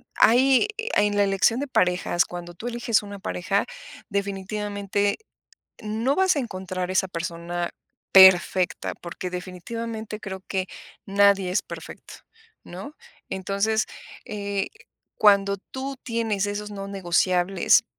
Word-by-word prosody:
hay 260 - +5 0.3
En 205 0 +3
la 205 - +5
elección 200 +5 +2
de 285 - -2
parejas, 180 -5 +2
cuando 175 0 -8
tú 225 +8 -7
eliges 235 -2 +1
una 200 -1 -8
pareja, 195 +3 -1 0.4
definitivamente, 200 0 -1 0.7
no 225 +6 0
vas 375 -4 +3
a - - +2
encontrar 185 -5 -4
esa 190 0 +1
persona 170 0 -4 0.4
perfecta, 190 -1 +6
porque 175 +1 -6
definitivamente, 215 +5 -5
creo 190 -2 -6
que 190 -1 -1 0.4
nadie 200 -1 +4
es 185 - +1
perfecto, - - -10 0.5
¿no? 190 - -9 0.3
Entonces, 200 +3 0 0.4
eh, 200 -1 -3 0.5
cuando 200 -1 +4
tú 265 +6 -6
tienes 225 -4 -1
esos: 210 +1 -4
"No 195 -1 -6
negociables", 180 -1 +2
200 Hz, 115 wpm, -25 LUFS, 185-215 Hz, 0.7 s, perfecta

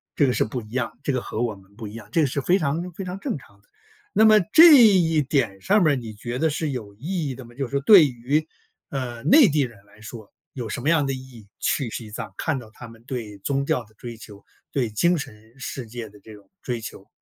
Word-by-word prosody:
这 145 - +3
个 125 - +1
是 - - +2
不 120 +3 -4
一 105 - -14
样， 120 -1 -3
这 140 - 0
个 125 - -1
和 110 - -5
我 110 -4 -2
们 95 +1 -21
不 110 -3 -7
一 105 - -10
样， 110 -3 -10
这 165 - +1
个 145 - +3
是 140 +2 -2
非 180 +7 +3
常 160 +4 -2
非 190 +2 -6
常 185 +2 -6
正 155 - -3
常 100 -6 -19
的。 - - -35 0.4
那 220 - +5
么 215 -1 +7
这 325 -1 +10
一 170 -7 +4
点 120 -9 -1
上 205 -1 +3
面 150 -2 +4
儿， - - +1
你 115 -4 -6
觉 120 +4 -5
得 160 +1 +2
是 150 0 -2
有 105 -6 -7
意 155 - -3
义 130 - -5
的 130 - -10
吗？ 120 - -15
就 135 - -2
是 - - -18
说 140 - +1
对 170 -1 +8
于， 135 +5 -1 0.4
呃， 125 -4 -5
内 255 - +7
地 150 -2 +1
人 115 -6 -5
来 105 +1 -21
说 110 -1 -11 0.2
有 120 -4 -5
什 115 - -5
么 145 - 0
样 160 -4 +3
的 135 - -1
意 130 - -4
义， 125 -5 -13
去 130 -4 0
西 110 -1 -6
藏 - - -7
看 155 -4 -1
到 110 -3 -12
他 120 +2 -11
们 115 0 -16
对 115 -6 -6
宗 140 +7 -1
教 125 - 0
的 110 - -25
追 120 -2 -9
求， 105 -2 -13 0.3
对 125 -5 -1
精 170 +12 +2
神 110 -4 -9
世 130 -2 -6
界 115 -1 -7
的 105 0 -18
这 110 +2 -14
种 100 -2 -17
追 120 -3 -3
求。 - - -9
125 Hz, 285 characters per minute, -23 LUFS, 110-150 Hz, 0.4 s, 这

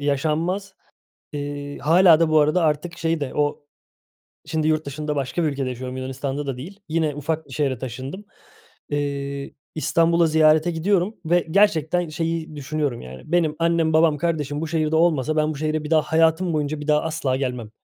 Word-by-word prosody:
yaşanmaz." 160 +7 -1 0.6
Eee, 145 -1 -5
hâlâ 170 +1 +5
da 165 - +4
bu 155 - +5
arada 155 +4 +2
artık 160 +2 -1
şey 165 -1 0
de 140 -3 -4
o 145 0 -1 0.8
şimdi 155 -1 -1
yurt 155 -1 +1
dışında 150 +2 -4
başka 140 +5 -1
bir - - +2
ülkede 135 -2 -2
yaşıyorum 130 +1 -6
Yunanistan'da 135 +2 -4
da 135 - -3
değil, 185 +10 -9
yine 155 -2 0
ufak 155 +2 -3
bir 135 - -11
şehre 135 -1 0
taşındım. 130 - -7 0.6
Eee, 140 -1 -3 0.2
İstanbul'a 165 +2 +3
ziyarete 155 +1 +4
gidiyorum 185 +4 0
ve 175 +2 +2
gerçekten 175 -3 +2
şeyi 165 0 -3
düşünüyorum, 145 -3 -2
yani, 65 +1 -10
benim 160 -3 +2
annem, 165 -1 +2
babam, 160 -2 +4
kardeşim 150 -2 -2
bu 165 - -2
şehirde 155 -1 0
olmasa 155 -3 +2
ben 155 0 +2
bu - - -9
şehre 155 +1 -1
bir 150 - -6
daha 155 - +5
hayatım 160 +2 +2
boyunca 150 0 -1
bir 150 - -7
daha 150 0 +3
asla 155 -5 -1
gelmem. 125 -4 -3
155 Hz, 175 wpm, -23 LUFS, 145-165 Hz, 0.8 s, hâlâ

